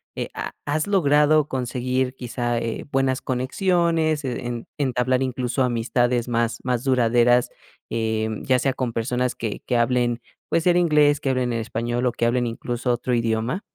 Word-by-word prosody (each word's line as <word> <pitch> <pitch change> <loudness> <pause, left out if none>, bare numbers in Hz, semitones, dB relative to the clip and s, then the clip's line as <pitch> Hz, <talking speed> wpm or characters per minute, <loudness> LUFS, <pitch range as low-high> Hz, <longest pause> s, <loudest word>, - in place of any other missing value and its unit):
eh, - - -4
¿ha - - -5
has 155 +4 -1
logrado 150 -5 +3
conseguir 125 0 -1
quizá, 120 -1 -2
eh, 115 -1 -4
buenas 135 -1 0
conexiones, 160 +3 +1
e 125 -2 -4
en 120 -1 -5
entablar 130 -2 +1
incluso 130 0 -1
amistades 120 0 0
más 115 0 0
más 125 0 -1
duraderas, 120 -1 +3 0.4
eh, 110 -1 -1
ya 130 -1 +2
sea 135 - +1
con 125 -2 -3
personas 125 +2 -1
que 110 -3 -4
que 125 - 0
hablen, 120 0 +1 0.3
pues, 165 0 0
el 175 0 +5
inglés, 150 -4 +4
que 135 - 0
hablen 125 -1 0
en 115 - -1
español, 120 +2 -2
o 125 - +1
que 120 - -1
hablen 120 +1 +1
incluso 120 +2 -2
otro 125 +1 -2
idioma? 115 - 0
125 Hz, 165 wpm, -23 LUFS, 120-135 Hz, 0.4 s, el